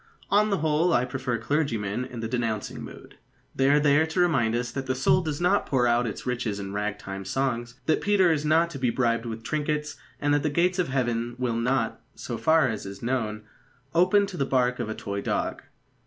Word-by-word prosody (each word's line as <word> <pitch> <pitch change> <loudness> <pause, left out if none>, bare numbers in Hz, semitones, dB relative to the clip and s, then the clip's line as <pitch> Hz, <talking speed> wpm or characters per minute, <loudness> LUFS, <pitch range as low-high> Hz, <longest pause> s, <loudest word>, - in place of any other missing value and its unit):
On 210 +2 +4
the 200 - +1
whole 160 +3 +2
I 120 - +3
prefer 125 -2 -2
clergymen 115 -4 -1
in 120 -2 -7
the 115 - -2
denouncing 115 -3 -2
mood. - - -11 0.4
They 135 0 +3
are 145 +1 +5
there 150 +2 +4
to 160 +3 -3
remind 135 -11 +2
us 120 0 -2
that 135 +1 -5
the 130 - 0
soul 135 +7 +3
does 155 -4 -3
not 180 +4 +2
pour 130 -3 +2
out 120 0 +2
its 110 - -6
riches 120 -5 -2
in 100 0 -6
rag 105 0 -2
time 95 -1 -7
songs, 120 +2 -2
that 160 - +2
Peter 195 -4 +4
is 150 -2 0
not 165 +2 +3
to 140 - -7
be 125 -2 +1
bribed 115 -1 0
with 115 0 -6
trinkets, 150 +2 -2 0.2
and 145 0 +1
that 145 - +3
the 150 - 0
gates 180 +5 +1
of 180 - +1
Heaven 120 -3 -1
will 125 -2 -1
not 115 0 0
so 120 -2 -5
far 160 -3 +4
as 110 -4 -4
is 100 +2 -9
known 110 -4 -2 0.5
open 185 +4 +4
to 195 -3 -8
the 140 - +1
bark 125 -2 +1
of 115 -3 -3
a 110 - -3
toy 100 0 -4
dog. - - -2
130 Hz, 220 wpm, -26 LUFS, 115-155 Hz, 0.5 s, are